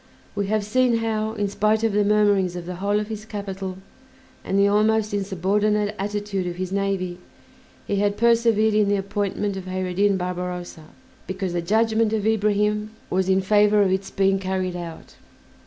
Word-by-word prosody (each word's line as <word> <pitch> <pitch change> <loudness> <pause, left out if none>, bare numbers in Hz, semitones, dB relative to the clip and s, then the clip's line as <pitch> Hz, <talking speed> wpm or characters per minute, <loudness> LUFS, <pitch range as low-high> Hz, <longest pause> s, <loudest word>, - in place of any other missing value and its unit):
We 200 -1 -2
have 215 0 0
seen 250 +2 +2
how, 220 -1 -1
in 205 -2 -1
spite 215 +2 +1
of 225 -2 +1
the 205 0 +3
murmurings 205 -3 +2
of 175 -1 -6
the 180 0 -6
whole 200 +2 +1
of 210 - -4
his 215 -1 -6
capital, 195 -3 -6 0.7
and 195 - -1
the 200 0 +5
almost 215 +1 +2
insubordinate 205 +2 0
attitude 205 -2 -2
of 175 - -4
his 185 0 -4
navy, 195 -2 -2 0.7
he 200 - -1
had 205 0 +1
persevered 230 -2 +3
in 210 -1 +3
the 205 - +3
appointment 200 0 -2
of 190 - -7
Kheyr 185 0 -3
ed 180 - -7
Din 200 -1 +3
Barbarossa, 180 -2 -5 0.4
because 190 -1 -3
the 175 - -1
judgment 220 +4 +2
of 215 -2 -1
Ibrahim 210 -1 +1 0.2
was 185 +1 +1
in 190 0 +3
favor 210 +1 +4
of 190 - +1
its 190 +1 -1
being 195 0 +1
carried 185 -1 -2
out. 170 -2 -8
200 Hz, 180 wpm, -23 LUFS, 190-210 Hz, 0.7 s, the